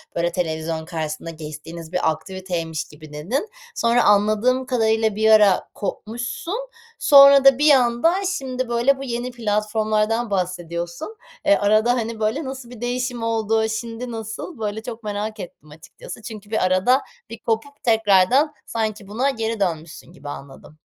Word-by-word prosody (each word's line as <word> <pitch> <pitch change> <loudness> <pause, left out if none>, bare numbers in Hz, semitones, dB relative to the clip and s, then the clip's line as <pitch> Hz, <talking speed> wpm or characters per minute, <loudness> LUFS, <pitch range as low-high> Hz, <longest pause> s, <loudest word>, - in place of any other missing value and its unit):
böyle, 170 0 0
televizyon 160 -2 -3
karşısında 160 -1 -5
geçtiğiniz 160 +1 -9
bir 180 -3 +1
aktiviteymiş 165 -1 -4
gibi, 150 0 -14
dedin. 235 - -3 0.3
Sonra 235 +1 +3
anladığım 215 +5 +3
kadarıyla 220 -3 +1
bir 220 +1 +2
ara 210 -3 +5
kopmuşsun. 240 - -5 0.3
Sonra 275 -1 +8
da 270 -2 +8
bir 300 +1 +5
anda 250 +5 +4 0.2
şimdi, 255 -2 -4
böyle, 240 +4 +2
bu 275 - -7
yeni 245 0 -3
platformlardan 215 0 0
bahsediyorsun. 180 - -3 0.3
E, 300 0 +6
arada, 215 +4 +3
hani, 230 -2 -3
böyle, 220 +9 0
nasıl 260 -2 -7
bir 245 -2 -12
değişim 245 -1 -2
oldu, 220 -1 +1
şimdi 230 +2 -5
nasıl? 225 - -7
Böyle, 215 0 -3
çok 235 -1 -7
merak 210 +1 -4
ettim 155 -4 -10
açıkçası, 160 +8 -11
çünkü 215 -1 -10
bir 220 - +1
arada 185 +9 +3 0.3
bir 230 - -8
kopup 235 +6 -3
tekrardan 225 +6 +3
sanki 215 -3 -3
buna 245 +7 0
geri 225 -3 -2
dönmüşsün 165 -3 -3
gibi 145 -4 -10
anladım. 140 +2 -10
220 Hz, 145 wpm, -22 LUFS, 185-245 Hz, 0.3 s, Sonra